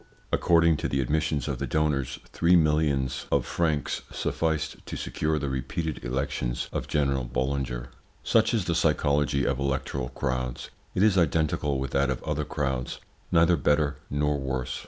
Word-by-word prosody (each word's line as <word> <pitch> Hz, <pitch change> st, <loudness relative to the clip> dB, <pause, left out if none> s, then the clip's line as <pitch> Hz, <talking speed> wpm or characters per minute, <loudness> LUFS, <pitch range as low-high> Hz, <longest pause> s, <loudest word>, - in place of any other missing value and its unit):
According 85 Hz, -2 st, +4 dB
to -, -, -2 dB
the 70 Hz, -, -1 dB
admissions 75 Hz, +2 st, 0 dB
of 70 Hz, -4 st, -2 dB
the 70 Hz, -, -2 dB
donors, 70 Hz, -2 st, 0 dB, 0.2 s
three 85 Hz, +2 st, +4 dB
millions 75 Hz, -5 st, +2 dB
of -, -, +2 dB
francs 80 Hz, -4 st, 0 dB
sufficed 80 Hz, -2 st, -1 dB
to -, -, -4 dB
secure 75 Hz, 0 st, -1 dB
the 70 Hz, -1 st, -2 dB
repeated 70 Hz, +4 st, -3 dB
elections 60 Hz, -1 st, -2 dB
of -, -, -3 dB
General 70 Hz, -3 st, +1 dB
Boulanger. 65 Hz, -1 st, -2 dB, 0.3 s
Such 110 Hz, -1 st, +3 dB
is 110 Hz, -6 st, 0 dB
the 85 Hz, -, 0 dB
psychology 75 Hz, -3 st, +2 dB
of 65 Hz, -2 st, 0 dB
electoral 70 Hz, -1 st, -2 dB
crowds. 65 Hz, -3 st, -3 dB, 0.2 s
It 95 Hz, -, +3 dB
is 105 Hz, -3 st, +5 dB
identical 75 Hz, -3 st, +1 dB
with 65 Hz, -1 st, -3 dB
that 70 Hz, 0 st, +2 dB
of 65 Hz, -, -2 dB
other -, -, -1 dB
crowds: 65 Hz, -3 st, -2 dB, 0.3 s
neither 85 Hz, 0 st, +5 dB
better 75 Hz, -1 st, +1 dB
nor 75 Hz, 0 st, 0 dB
worse. 65 Hz, -2 st, -3 dB
70 Hz, 155 wpm, -27 LUFS, 65-80 Hz, 0.3 s, is